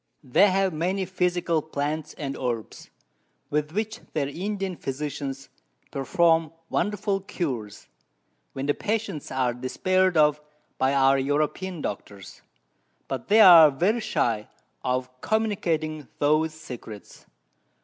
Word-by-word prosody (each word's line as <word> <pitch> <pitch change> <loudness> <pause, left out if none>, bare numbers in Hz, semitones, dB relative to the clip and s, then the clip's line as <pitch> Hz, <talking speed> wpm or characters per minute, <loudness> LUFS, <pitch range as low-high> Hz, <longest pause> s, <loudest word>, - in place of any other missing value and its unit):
They 150 +10 +4
have 190 -1 +1
many 185 +5 -1
Physical 175 -3 0
Plants 150 0 -4
and 140 -2 -4
Herbs, 120 -4 -4 0.6
with 150 +1 0
which 215 +4 -3
their 145 -3 0
Indian 195 +4 -3
Physicians 140 -1 -5 0.4
perform 160 +5 +2 0.2
wonderful 205 -1 0
Cures, 135 - -5 0.7
when 135 - -4
the 145 - +2
Patients 215 -8 -3
are 130 -2 0
despair'd 185 +9 +1
of 150 -1 +4 0.4
by 135 +1 +2
our 135 0 +4
European 150 +5 -1
Doctors, 100 -4 -7 0.7
but 130 -3 -5
they 215 +2 +6
are 170 -6 +10
very 180 - +1
shy 115 - 0 0.4
of 125 0 0
communicating 165 -9 -1
those 155 +2 +2
Secrets. 120 -8 -10
155 Hz, 115 wpm, -25 LUFS, 135-185 Hz, 0.7 s, are